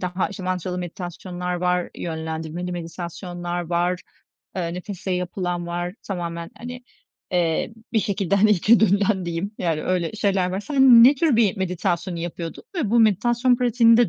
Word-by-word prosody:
daha, 180 +1 -1
işte, 195 -2 -8
mantralı 180 0 -2
meditasyonlar 180 0 -5
var, 180 0 0
yönlendirmeli 160 +2 -4
meditasyonlar 175 +1 -5
var, 175 +2 0 0.6
eee, 170 -1 -2
nefesle 185 0 -5
yapılan 180 -1 -2
var, 175 +1 -3
tamamen, 170 -3 -4
hani, 250 +1 -7 0.5
ııı, 165 -2 +2 0.3
bir 220 - +3
şekilde, 200 -2 0
hani, 215 +2 +5
içe 210 +4 +5
dönülen 200 -2 +3
diyeyim 170 +5 -3
yani 165 -4 -1
öyle 180 -1 0
şeyler 195 -4 +1
var. 190 +2 -2
Sen 265 -2 +7
ne 275 +3 +7
tür 285 -4 +2
bir 220 -2 +3
meditasyonu 180 -1 -1
yapıyordun 170 0 -5
ve 270 - -1
bu 235 - +5
meditasyon 240 +4 +3
pratiğini 235 -2 +5
de 240 -2 +4
180 Hz, 155 wpm, -23 LUFS, 175-210 Hz, 0.6 s, Sen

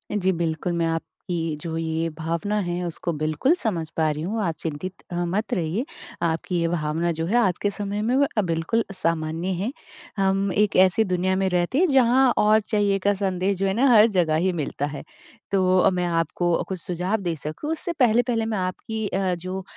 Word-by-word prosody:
जी 190 -2 +2
बिल्कुल, 170 0 -1
मैं 170 -1 0
आपकी 165 0 -2 0.6
जो 165 -1 -4
ये 165 0 -1
भावना 170 +6 -2
है 175 +1 -2
उसको 170 +1 -3
बिल्कुल 155 - +1
समझ 180 -9 -1
पा 160 -1 +3
रही 150 +1 -4
हूँ। 215 +4 -2
आप 165 -3 -1
चिंतित 165 +4 -5
अ, - - -3
मत 195 +6 -2
रहिए 180 - -1 0.4
आपकी 170 +2 -1
ये 165 - +1
भावना 165 +1 -1
जो 165 0 -2
है 210 +7 0
आज 190 -7 +2
के 205 - +2
समय 205 0 -3
में 240 +4 +1 0.2
अ, - - +5
बिल्कुल 170 +6 0
सामान्य 165 0 -1
है। 200 +8 -2 0.5
हम 195 0 +1
एक 210 0 +2
ऐसी 190 +4 +5
दुनिया 185 0 0
में 190 0 +1
रहते 180 +8 0
हैं 365 +2 +4
जहाँ 260 -1 +4
और 215 +1 +5
चाहिए 205 -2 +1
का 205 +2 +2
संदेश 190 -1 -1
जो 195 - 0
है 190 - +1
ना 260 +6 +3
हर 215 +1 +8
जगह 170 -5 +2
ही 185 +4 +2
मिलता 145 -2 -2
है। 145 -1 -6 0.5
तो 185 -1 +3
अ, - - +5
मैं 180 -1 -1
आपको 170 0 0
कुछ 185 -2 -3
सुझाव 180 +4 -1
दे 170 -3 -1
सकूँ 155 - -4
उससे 340 +2 -3
पहले-पहले 235 -1 +3
मैं 220 -2 -2
आपकी 210 +4 -3
अ, 190 -1 0
जो 185 +2 -5
185 Hz, 200 wpm, -24 LUFS, 165-210 Hz, 0.6 s, हर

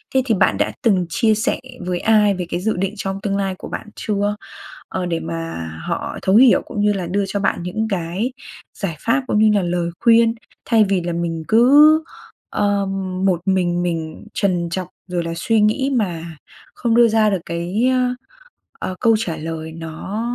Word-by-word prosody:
Thế 260 - +5
thì 225 -5 +2
bạn - - +2
đã - - 0
từng 190 -6 +2
chia 220 +5 +2
sẻ 220 - 0 0.3
với 180 -1 -1
ai 210 -2 +4
về 180 -1 -3
cái 175 - -2
dự 220 +4 -1
định 195 +2 -1
trong 195 0 -4
tương 200 -1 -1
lai 195 -1 -1
của - - -8
bạn 225 - -6
chưa, 205 0 -1 0.5
ờ, 185 -1 -3
để 170 -1 -1
mà 165 - -5 0.2
họ - - -3
thấu 190 +2 +2
hiểu 245 +1 +6
cũng 210 - -4
như 210 0 +3
là 185 -3 -3
đưa 200 +3 0
cho 200 +1 -2
bạn 185 - 0
những 215 +5 -2
cái 190 +7 -2 0.5
giải 175 -6 -2
pháp 260 +4 +1
cũng 210 - +1
như 215 0 +5
là - - -2
lời 175 -1 -1
khuyên, 230 -1 +5 0.3
thay 225 -2 +4
vì 190 -3 +1
là 175 0 -3
mình 165 -1 -3
cứ, 290 +7 +6 0.5
ờ, 205 -1 +1 0.4
một 180 -3 +2
mình 175 -2 +1
mình 165 0 -4
trần 180 -4 0
trọc, 180 +1 -3 0.2
rồi 175 -1 -2
là 165 0 -4
suy 220 +5 +1
nghĩ 265 +6 +2
mà 170 -7 -2 0.4
không 235 -2 0
đưa 240 -1 +6
ra 220 -1 +3
được 195 -3 -1
cái, 175 +8 -1
ơ 250 -1 +1 0.7
ờ, 185 - -4
câu 225 -1 +4
trả 180 -7 -3
lời 160 0 -6
nó 165 +6 -6
195 Hz, 200 wpm, -20 LUFS, 175-220 Hz, 0.7 s, hiểu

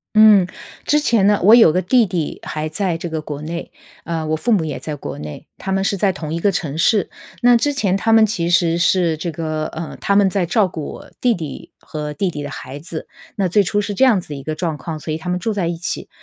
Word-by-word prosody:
嗯， 210 -4 +7 0.4
之 300 - +3
前 230 -8 +3
呢 205 -1 +4
我 215 +4 +7
有 225 -9 +8
个 180 +2 0
弟 245 +5 +4
弟 170 -4 -3
还 155 0 -4
在 170 +1 -1
这 170 0 -5
个 160 -1 -3
国 150 -1 -6
内。 170 +2 -5 0.3
呃， 165 -2 -2
我 155 0 0
父 235 +9 -1
母 180 -7 +3
也 150 - -4
在 150 -2 -5
国 - - -7
内， 75 0 -8
他 190 - -4
们 195 0 +1
是 200 0 0
在 195 0 +2
同 160 -4 -6
一 170 - -2
个 200 +3 +2
城 150 -5 -3
市。 210 +3 +3 0.3
那 245 0 +6
之 290 +5 +2
前 195 -8 +1
他 225 +3 0
们 225 -1 +7
其 175 -5 -2
实 170 -1 +3
是 170 -2 +2
这 170 +1 -3
个 155 -1 -3
呃， 160 0 -7
他 200 - +1
们 200 -1 +5
在 185 -3 0
照 210 0 +3
顾 160 -3 -6
我 - - -12
弟 245 -2 +3
弟 155 -5 -7
和 150 -1 -6
弟 185 +3 -1
弟 150 - -6
的 145 - -5
孩 135 +1 -8
子， 160 0 -7 0.3
那 195 -3 +1
最 205 +4 +3
初 205 +2 0
是 205 0 -3
这 260 - +2
样 235 -7 +5
子 170 - -11
的 145 - -5
一 140 - -7
个 155 +2 -4
状 160 -2 -2
况， 160 -2 -5
所 155 +1 -4
以 - - -2
他 180 +2 -6
们 180 0 0
住 220 +3 -1
在 185 -5 -1
一 170 -1 -2
起。 170 - -4
175 Hz, 285 characters per minute, -19 LUFS, 155-205 Hz, 0.4 s, 有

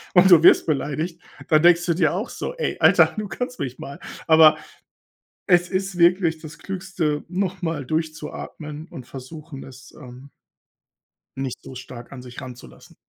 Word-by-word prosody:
und 180 +1 +6
du 165 -2 +8
wirst - - +7
beleidigt, 155 +4 -2 0.3
dann 155 0 +4
denkst 175 0 +5
du 170 - +2
dir 165 -3 +2
auch 210 +6 -3
so: - - -6
„Ey, 485 - -3
Alter, - - +5
du 210 -1 -3
kannst 250 +4 -5
mich 130 -2 -5
mal.“ 140 +1 -8 0.3
Aber 160 -1 +7 0.9
es 180 -1 +4
ist 190 -1 -3
wirklich 170 -2 +3
das 160 +1 -11
Klügste, 180 -6 -3
noch 185 0 -2
mal 160 -5 -3
durchzuatmen 155 0 -5
und 125 - -10
versuchen, 140 +2 -10
es, 130 0 -14
ähm, 130 +1 -13 1.1
nicht 135 -2 -4
so 130 - -10
stark 125 -1 -10
an 125 -2 -9
sich 125 -1 -10
ranzulassen. 125 - -12
160 Hz, 160 wpm, -22 LUFS, 135-180 Hz, 1.1 s, du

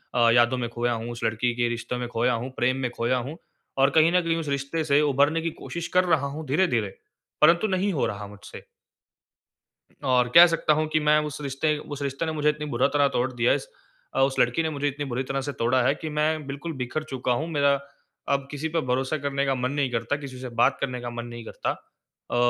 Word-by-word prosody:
अ, 120 -1 +5
यादों 120 +2 +4
में 120 -1 -2
खोया 120 +1 -1
हूँ, 115 +1 -4
उस 120 - -7
लड़की 115 +2 0
के 120 -1 +1
रिश्तों 120 +1 -4
में 125 -1 -3
खोया 120 +1 +1
हूँ, 120 +3 -3
प्रेम 130 +2 +1
में - - -6
खोया 120 +2 0
हूँ। 160 - -8 0.4
और 135 +1 +5
कहीं 160 +2 +5
न 180 0 +3
कहीं 165 0 0
उस 160 - -4
रिश्ते 140 +3 -2
से 145 -1 +3
उभरने 145 +2 +2
की 165 - -1
कोशिश 170 -1 -5
कर 185 - +6
रहा 160 -5 +2
हूँ 150 +3 -6
धीरे-धीरे 130 - +1 0.4
परंतु 170 +7 +5
नहीं 195 0 0
हो 145 - +1
रहा 105 -2 -4
मुझसे। 100 0 -11 1.4
और 125 -2 +2
कह 175 +1 +11
सकता 165 -2 +2
हूँ 155 +1 0
कि 155 - +4
मैं 150 0 +4
उस 150 0 -6
रिश्ते 145 +2 0
उस 145 -1 -7
रिश्ते 140 +3 -2
ने 160 - -2
मुझे 150 -1 +1
इतनी 150 0 -2
बुरा 120 +3 +3
तरह 145 -1 +4
तोड़ 125 +2 +1
दिया 120 0 +2
है - - +3
स - - -10 0.5
अ, - - +2
उस 135 0 +2
लड़की 125 +7 +2
ने 160 - 0
मुझे 145 -1 -2
इतनी 145 +1 -3
बुरी 130 -1 -2
तरह 135 +1 -2
से 145 +2 -3
तोड़ा 125 +3 +2
है 130 - +3
कि 160 - -6
मैं 155 0 0
बिल्कुल 145 +4 -5
बिख़र 130 +5 -3
चुका 130 -1 -2
हूँ। 150 +7 0
मेरा 145 -3 +2 0.6
अब 140 -1 0
किसी 145 +2 -3
पे 165 +1 0
भरोसा 130 +4 0
करने 140 -1 -1
का 135 - +1
मन 125 +1 -1
नहीं 140 -3 0
करता 115 +3 -1
किसी 135 -3 -8
से 130 0 -6
बात 120 +3 +2
करने 125 -2 -2
का 120 - -4
मन 120 0 -6
नहीं 120 -1 -8
करता। - - -4 0.6
अ, - - -1
140 Hz, 240 wpm, -25 LUFS, 120-150 Hz, 1.4 s, कह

